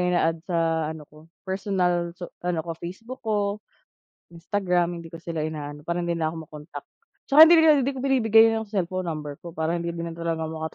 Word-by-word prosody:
ina-add 175 Hz, -2 st, +1 dB
sa 165 Hz, -2 st, +1 dB
ano 160 Hz, -1 st, -8 dB
ko, 150 Hz, -, -19 dB, 0.3 s
personal 185 Hz, -3 st, 0 dB
so 175 Hz, -1 st, -6 dB, 0.2 s
ano 175 Hz, -3 st, -1 dB
ko, 170 Hz, -, -4 dB
Facebook 225 Hz, +9 st, -8 dB
ko, 210 Hz, -2 st, -1 dB, 0.7 s
Instagram, 175 Hz, -1 st, -1 dB
hindi 165 Hz, 0 st, -12 dB
ko 165 Hz, -, -9 dB
sila 165 Hz, -2 st, -3 dB
ina-add 150 Hz, -1 st, -6 dB
para 170 Hz, +1 st, -1 dB
hindi 170 Hz, -1 st, -1 dB
nila 160 Hz, -1 st, -1 dB
ako -, -, -8 dB
ma-contact. 150 Hz, -1 st, -10 dB, 0.4 s
Tsaka 310 Hz, +3 st, +10 dB
hindi 340 Hz, -, +7 dB
rin 310 Hz, -3 st, +6 dB
hindi 275 Hz, -, 0 dB
ko 260 Hz, -, -6 dB
binibigay 225 Hz, -5 st, +5 dB
yung 225 Hz, 0 st, -2 dB
cellphone 185 Hz, -3 st, -2 dB
number 150 Hz, -3 st, -5 dB
ko 170 Hz, -, -10 dB
para 160 Hz, +1 st, -1 dB
hindi 170 Hz, 0 st, -3 dB
na 170 Hz, 0 st, -4 dB
talaga 165 Hz, -1 st, -2 dB
maka 160 Hz, -1 st, -5 dB
170 Hz, 195 wpm, -25 LUFS, 160-200 Hz, 0.7 s, Tsaka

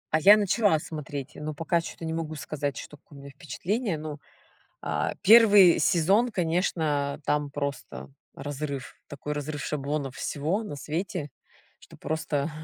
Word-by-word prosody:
А -, -, +3 dB
я 205 Hz, +6 st, +8 dB
начала 205 Hz, -3 st, +3 dB
смотреть, 150 Hz, -2 st, -6 dB
но 150 Hz, 0 st, -6 dB
пока 165 Hz, +2 st, 0 dB
чё-то 165 Hz, -, -8 dB
не 160 Hz, -, -2 dB
могу 160 Hz, -1 st, -4 dB
сказать, 145 Hz, -3 st, -4 dB
что 150 Hz, -, -9 dB
какое 145 Hz, -, -17 dB
у 140 Hz, -, -11 dB
меня 140 Hz, -, -10 dB
впечатление. 180 Hz, -, -3 dB
Ну, 150 Hz, -1 st, -6 dB, 0.6 s
а, -, -, -1 dB
1 205 Hz, -5 st, +8 dB
сезон, 195 Hz, +8 st, +3 dB
конечно, 160 Hz, -6 st, 0 dB
там 150 Hz, -1 st, 0 dB
просто 140 Hz, -1 st, -5 dB, 0.2 s
разрыв, 140 Hz, -1 st, -5 dB
такой 145 Hz, +1 st, -6 dB
разрыв 150 Hz, -1 st, -4 dB
шаблонов 145 Hz, -2 st, -3 dB
всего 160 Hz, +10 st, -2 dB
на 175 Hz, -9 st, -6 dB
свете, 150 Hz, 0 st, -4 dB, 0.5 s
что -, -, -16 dB
просто. 155 Hz, -2 st, -2 dB
155 Hz, 145 wpm, -27 LUFS, 145-175 Hz, 0.6 s, я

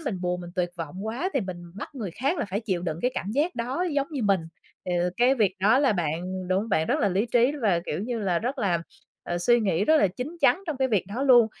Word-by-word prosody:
mình 225 Hz, -, -3 dB
buồn, 180 Hz, 0 st, -1 dB
mình 175 Hz, -1 st, -8 dB
tuyệt 175 Hz, -1 st, 0 dB
vọng 170 Hz, +5 st, -6 dB
quá 245 Hz, +12 st, -2 dB
thì 275 Hz, -, +2 dB
mình 185 Hz, -4 st, -5 dB, 0.2 s
bắt 230 Hz, -, -8 dB
người 215 Hz, -9 st, -4 dB
khác 270 Hz, -, -1 dB
là -, -, 0 dB
phải 200 Hz, +1 st, -3 dB
chịu 185 Hz, -6 st, -2 dB
đựng 165 Hz, -2 st, -3 dB
cái 250 Hz, -, +2 dB
cảm 200 Hz, -, -3 dB
giác 300 Hz, +10 st, 0 dB
đó 255 Hz, +9 st, -2 dB
giống 280 Hz, -1 st, +1 dB
như 275 Hz, -6 st, -3 dB
mình. 195 Hz, -3 st, +3 dB, 0.5 s
Thì, 180 Hz, -, -1 dB
ờ, 180 Hz, +1 st, +1 dB
cái 250 Hz, +3 st, +4 dB
việc 205 Hz, -6 st, +2 dB
đó 215 Hz, +7 st, +5 dB
là 275 Hz, -4 st, +3 dB
bạn 180 Hz, +1 st, -3 dB
đúng 185 Hz, +1 st, +2 dB
không 225 Hz, -, -5 dB
bạn 160 Hz, -6 st, +1 dB
rất 290 Hz, +5 st, +1 dB
là 205 Hz, -, +3 dB
lý 195 Hz, +5 st, 0 dB
trí 240 Hz, +3 st, +3 dB
và, 185 Hz, -6 st, +3 dB
kiểu -, -, -2 dB
như 235 Hz, +3 st, -3 dB
là, 185 Hz, -5 st, +1 dB
rất 255 Hz, -, -3 dB
là, 185 Hz, -6 st, +1 dB, 0.4 s
ờ, 175 Hz, -, -3 dB
suy 240 Hz, +7 st, +4 dB
nghĩ 195 Hz, -2 st, +1 dB
rất 315 Hz, -, +5 dB
là 250 Hz, -, +5 dB
chín 255 Hz, -, -6 dB
chắn 380 Hz, -, +4 dB
trong 315 Hz, -4 st, -2 dB
cái 265 Hz, 0 st, +1 dB
việc 210 Hz, -6 st, +1 dB
đó 230 Hz, +8 st, -4 dB
luôn. 245 Hz, -5 st, +7 dB
210 Hz, 280 wpm, -26 LUFS, 180-255 Hz, 0.5 s, luôn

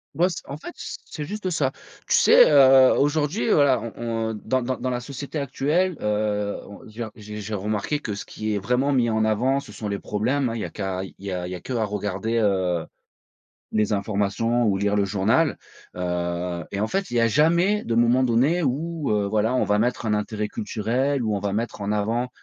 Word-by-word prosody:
Moi 180 Hz, +3 st, +3 dB
c -, -, -5 dB
en 140 Hz, -, -5 dB
fait -, -, -9 dB
c -, -, -6 dB
c'est 150 Hz, -, -6 dB
juste 205 Hz, +2 st, -4 dB
ça. 145 Hz, -6 st, 0 dB, 0.4 s
Tu -, -, +3 dB
sais, -, -, +7 dB
heu, 135 Hz, -3 st, +7 dB
aujourd'hui 150 Hz, +9 st, +1 dB
voilà 140 Hz, -, +4 dB
on 115 Hz, -1 st, -3 dB
on -, -, -4 dB
dans 130 Hz, 0 st, +1 dB
dans 130 Hz, +1 st, -2 dB
dans 130 Hz, -, -3 dB
la 125 Hz, -1 st, -2 dB
société 140 Hz, +3 st, -6 dB
actuelle, 150 Hz, +6 st, 0 dB
heu, 105 Hz, -1 st, -1 dB
on 100 Hz, -, -12 dB
il 110 Hz, -, -15 dB
y 120 Hz, -, -4 dB
a 110 Hz, -, -7 dB
j'ai 105 Hz, -1 st, -9 dB
j'ai 105 Hz, +2 st, -6 dB
remarqué 105 Hz, +8 st, -1 dB
que 105 Hz, -8 st, -4 dB
ce -, -, -6 dB
qui 110 Hz, -1 st, -3 dB
est 100 Hz, -, 0 dB
vraiment 125 Hz, +7 st, +1 dB
mis 120 Hz, -3 st, +2 dB
en 110 Hz, 0 st, +1 dB
avant, 125 Hz, +6 st, +1 dB
ce 105 Hz, -, -11 dB
sont 105 Hz, -1 st, -5 dB
les 100 Hz, -1 st, -2 dB
problèmes, 125 Hz, +6 st, -1 dB
hein, 115 Hz, -, -4 dB
il 115 Hz, -, -3 dB
y -, -, -2 dB
a -, -, -6 dB
qu'à 95 Hz, -2 st, -3 dB
il 95 Hz, -, -9 dB
y 100 Hz, 0 st, -5 dB
a 90 Hz, -1 st, -3 dB
il 90 Hz, -, -7 dB
y -, -, -3 dB
a 90 Hz, -, -7 dB
qu'à 120 Hz, +1 st, -2 dB
regarder, 105 Hz, +2 st, -2 dB
heu, 95 Hz, -5 st, +1 dB, 0.9 s
les 110 Hz, 0 st, +1 dB
informations 105 Hz, +3 st, 0 dB
ou 100 Hz, -2 st, +2 dB
lire 100 Hz, +1 st, +1 dB
le 100 Hz, -1 st, +2 dB
journal, 110 Hz, +11 st, +2 dB, 0.4 s
heu, 85 Hz, -1 st, -2 dB
et 100 Hz, -, -2 dB
en 105 Hz, -, +1 dB
fait, 195 Hz, -1 st, -2 dB
il 120 Hz, -, -2 dB
y 115 Hz, -, +4 dB
a 115 Hz, -, +4 dB
jamais 170 Hz, -, +3 dB
de 115 Hz, -, -1 dB
moment 120 Hz, +2 st, +4 dB
donné 130 Hz, +8 st, +2 dB
où, 155 Hz, +3 st, -2 dB
heu, 105 Hz, -1 st, +2 dB
voilà 110 Hz, +4 st, +1 dB
on 125 Hz, -, +2 dB
va 105 Hz, 0 st, +1 dB
mettre 120 Hz, +2 st, 0 dB
un 110 Hz, -, 0 dB
intérêt 105 Hz, 0 st, -2 dB
culturel, 125 Hz, +7 st, -1 dB
où 110 Hz, -2 st, 0 dB
on 100 Hz, -, -2 dB
va 100 Hz, 0 st, -2 dB
mettre 115 Hz, 0 st, -3 dB
en 100 Hz, 0 st, -2 dB
avant, 110 Hz, +4 st, 0 dB
115 Hz, 235 wpm, -24 LUFS, 105-135 Hz, 0.9 s, sais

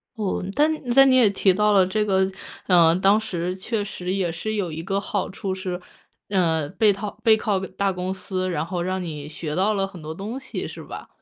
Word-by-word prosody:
哦， 210 Hz, -4 st, -2 dB
但 300 Hz, +2 st, +4 dB, 0.2 s
但 270 Hz, 0 st, +8 dB
你 255 Hz, -, +5 dB
也 245 Hz, -5 st, +6 dB
提 195 Hz, -1 st, +3 dB
到 210 Hz, +2 st, +3 dB
了 190 Hz, -2 st, +5 dB
这 210 Hz, +3 st, 0 dB
个， 190 Hz, -2 st, +2 dB, 0.4 s
呃， 170 Hz, -3 st, +5 dB
当 195 Hz, +3 st, +4 dB
时 180 Hz, -4 st, -3 dB
确 205 Hz, +3 st, -2 dB
实 180 Hz, -2 st, -5 dB
也 190 Hz, -3 st, 0 dB
是 215 Hz, +7 st, -4 dB
有 185 Hz, -6 st, -2 dB
一 160 Hz, -, -5 dB
个 195 Hz, +4 st, -1 dB
好 200 Hz, -1 st, -2 dB
处 190 Hz, 0 st, -4 dB
是， 185 Hz, -1 st, -4 dB, 0.5 s
呃， 165 Hz, -6 st, +1 dB
背 210 Hz, +4 st, +3 dB
套 200 Hz, 0 st, -4 dB
背 220 Hz, -1 st, +6 dB
靠 210 Hz, -3 st, 0 dB
大 195 Hz, +1 st, -2 dB
公 180 Hz, +1 st, -3 dB
司， 185 Hz, -1 st, -3 dB
然 155 Hz, -2 st, -1 dB
后 175 Hz, 0 st, -3 dB
让 185 Hz, +1 st, -2 dB
你 150 Hz, -3 st, -6 dB
学 150 Hz, 0 st, -5 dB
到 195 Hz, +4 st, +2 dB
了 195 Hz, -1 st, 0 dB
很 185 Hz, -4 st, -12 dB
多 155 Hz, +1 st, -6 dB
东 215 Hz, +8 st, -5 dB
西 265 Hz, -, -5 dB
是 -, -, -9 dB
吧？ -, -, -9 dB
190 Hz, 235 characters per minute, -23 LUFS, 180-210 Hz, 0.5 s, 但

